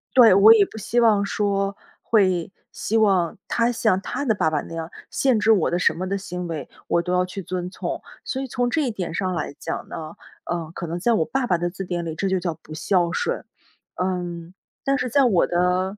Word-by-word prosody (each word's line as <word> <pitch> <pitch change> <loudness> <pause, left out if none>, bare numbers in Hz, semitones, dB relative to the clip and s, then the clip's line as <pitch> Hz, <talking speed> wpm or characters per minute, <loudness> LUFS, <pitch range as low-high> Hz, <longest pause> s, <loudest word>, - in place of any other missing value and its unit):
对， 235 -6 +8
我 200 +4 +9
也 210 -3 +5
不 220 - -12
希 235 +3 0
望 215 -4 +4
说， 200 -1 -1 0.3
会， 185 -5 +2 0.2
希 225 - -1
望 190 -6 +2
他 235 0 +1
像 220 -5 +2
他 285 - -4
的 220 -5 +2
爸 160 - +2
爸 150 -2 -1
那 - - -10
样， 165 0 -5 0.2
限 255 -5 +2
制 225 - +4
我 190 - +2
的 175 - +1
什 - - +3
么 185 +3 -4
的 200 +1 -1
行 180 -2 -5
为， 155 -5 -5 0.2
我 170 - +2
都 180 +1 -2
要 180 0 +3
去 185 +2 -6
遵 180 0 -4
从。 - - -4 0.2
所 265 - -3
以 270 - -4
从 245 0 -1
这 310 +6 +1
一 255 -5 0
点 185 -6 -4
上 185 +1 -1
来 155 -4 -4
讲 - - -5
呢， 155 +1 -7 0.3
呃， 170 -2 -3
可 - - -4
能 170 +2 -3
在 235 +6 +2
我 185 -8 +2
爸 265 +5 -1
爸 180 - +2
的 175 +1 -1
字 190 +2 -6
典 175 -1 -3
里， 160 - -3
这 195 - -1
就 190 -1 +1
叫 175 -2 -2
“不 155 - -11
孝 175 +2 +1
顺”。 - - -2 0.5
嗯， 175 -2 -3 0.3
但 275 0 +2
是 255 - -1
在 275 +4 +4
我 210 -9 +3
的， 180 +3 +1
185 Hz, 250 characters per minute, -23 LUFS, 175-220 Hz, 0.5 s, 我